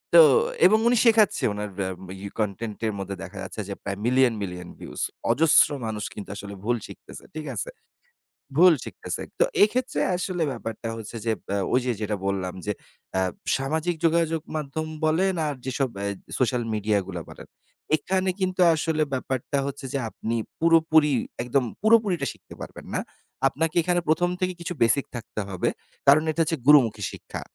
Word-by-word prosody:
তো - - +12 0.4
এবং 215 +3 +7
উনি 245 - +4
শেখাচ্ছে 220 -3 +4
উনার 105 0 -4
এ্যা 95 -1 -1 0.3
ইউ 100 - -5
কনটেন্ট 105 +1 -2
এর 110 - -1
মধ্যে 100 0 -4
দেখা 95 +2 -9
যাচ্ছে 110 - -6
যে, 100 - -2
প্রায় 100 - -3
মিলিয়ন 130 0 +4
মিলিয়ন 90 -2 -5
ভিউজ। - - -7 0.3
অজস্র 160 +5 +5 0.2
মানুষ 105 -1 -3
কিন্তু 100 -1 -8
আসলে 100 0 -7
ভুল 120 +2 +1
শিখতেছে। - - -12
ঠিক 155 -1 -5
আছে? - - -3 0.9
ভুল 180 +2 +8
শিখতেছে। - - -5 0.2
তো - - +7 0.2
এক্ষেত্রে 250 +5 +2 0.2
আসলে 180 -2 -2
ব্যাপারটা 115 -1 -5
হচ্ছে 110 +1 -8
যে 115 - +1 0.2
এ্যা 100 - 0 0.2
ওই 125 - +4
যে 125 - +2
যেটা 105 -1 -1
বললাম 95 -2 -1
যে 105 - +1 0.4
অ্যা 95 - +1 0.4
সামাজিক 160 +6 -1
যোগাযোগ 165 -1 +2 0.2
মাধ্যম 155 +1 -3 0.2
বলেন 180 +5 +2
আর 145 - -1
যেসব 130 0 0
এ্যা 100 - -1 0.3
সোশ্যাল 125 -1 +1
মিডিয়াগুলা 100 -4 -1
বলেন। - - -12 0.5
এখানে 185 +5 0
কিন্তু 185 0 0
আসলে 160 0 0
ব্যাপারটা 130 +1 -2
হচ্ছে 140 0 -6
যে, 140 - 0
আপনি 115 +1 -4 0.3
পুরোপুরি, 160 -2 +5 0.3
একদম 125 +2 +1 0.2
পুরোপুরিটা 210 -9 +4
শিখতে - - -15
পারবেন - - -9
না। - - +1 0.5
আপনাকে 160 +4 -2
এখানে 175 +1 +1
১ম 175 +3 +3
থেকে 185 0 +1
কিছু 170 +1 -4
বেসিক 115 +5 +3
থাকতে 110 -2 -6
হবে। 95 -2 -1 0.4
কারণ 145 +3 +7
এটা 155 - -2
হচ্ছে 165 0 -1
গুরুমুখী 120 -8 +6
শিক্ষা। - - -7
140 Hz, 165 wpm, -25 LUFS, 105-165 Hz, 0.9 s, তো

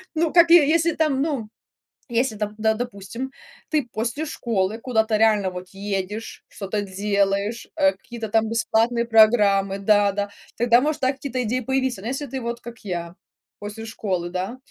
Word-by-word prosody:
Ну, 320 0 +1
как, 340 -1 +6
е 340 -4 +8
если 335 +1 +3
там, 300 -4 +1
ну, 275 -8 -2 0.6
если 240 0 0
там, 210 0 -3
да, 220 0 +2
допустим, 235 +2 -5 0.4
ты 300 -5 0
после 235 +8 -2
школы 220 -8 -1
куда-то 220 -3 +1
реально 210 -3 +3
вот 180 0 -8
едешь, 200 +2 -5
что-то 205 +1 -3
делаешь, 200 +2 -1
э, 290 -1 +4
какие-то 235 -2 -8
там 220 +1 +1
бесплатные 230 +1 +1
программы 210 -4 +4
Да-да, 205 0 +2 0.3
тогда, 240 +1 +4
может, 300 +2 0
да, 260 +1 +2
какие-то 265 -2 -4
идеи 245 +3 -1
появиться. 260 -3 -1
Но 215 - -6
если 270 +4 -3
ты, 265 0 -5
вот 235 0 -4
как 235 -1 -10
я, 175 -4 -5 0.4
после 210 +2 -7
школы, 185 -6 -3
да, 185 +7 -3
225 Hz, 165 wpm, -23 LUFS, 200-255 Hz, 0.6 s, е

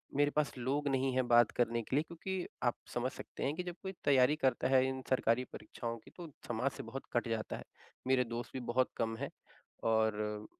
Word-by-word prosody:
मेरे 145 +1 +4
पास 150 -5 +1
लोग 135 +4 0
नहीं 135 -1 +2
है 130 - +4
बात 120 -2 +7
करने 120 -1 +2
के 115 - -3
लिए 150 - +4
क्योंकि 180 +2 -4 0.2
आप 120 -1 +3 0.2
समझ 125 +2 0
सकते - - -7
हैं 140 - +1
कि, 180 - -2
जब 175 -1 -5
कोई 190 - -3
तैयारी 135 +1 +5
करता 130 -3 +2
है 130 0 +5
इन 130 0 -3
सरकारी 125 -1 +3
परीक्षाओं 115 -1 -5
की 115 - -16
तो 175 -2 -6 0.2
समाज 120 +4 0
से - - -5
बहुत 135 - -6
कट 120 0 +1
जाता 115 -1 -2
है, - - -8 0.4
मेरे 130 -1 +4
दोस्त 120 0 -4
भी 130 - -3
बहुत 130 +1 +3
कम 115 0 0
हैं 140 +3 -3 0.6
और 105 -1 +1
130 Hz, 215 wpm, -34 LUFS, 115-140 Hz, 0.6 s, बात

